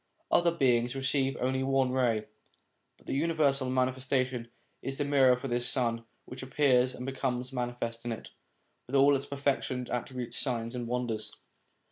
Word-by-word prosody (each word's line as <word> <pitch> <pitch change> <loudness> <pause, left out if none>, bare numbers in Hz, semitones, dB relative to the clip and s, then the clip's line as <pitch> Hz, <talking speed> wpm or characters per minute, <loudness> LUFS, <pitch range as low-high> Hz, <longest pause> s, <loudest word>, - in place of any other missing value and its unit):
Other 175 0 +4
beings 125 -7 +2
receive 135 0 0
only 130 +1 0
one 135 -1 +2
ray, 120 -4 +1 0.7
but - - -24
the - - -3
universal 140 -3 +2
Manifestation 130 -1 0 0.3
is 135 0 -4
the 145 - 0
mirror 135 -3 +5
for 135 - -5
this 120 -1 +1
Sun, 115 -3 0 0.2
which - - -8
appears 130 -1 +2
and 125 - -6
becomes 130 -1 -2
manifest 120 -2 -3
in 120 - -3
it, 115 - -7 0.6
with 130 - -3
all 140 +1 +6
its 135 +1 -3
perfections, 140 -3 -1
attributes, 125 0 -3
signs, 115 -3 -1
and 120 -2 -4
wonders. 120 -2 -2
130 Hz, 155 wpm, -30 LUFS, 120-135 Hz, 0.7 s, all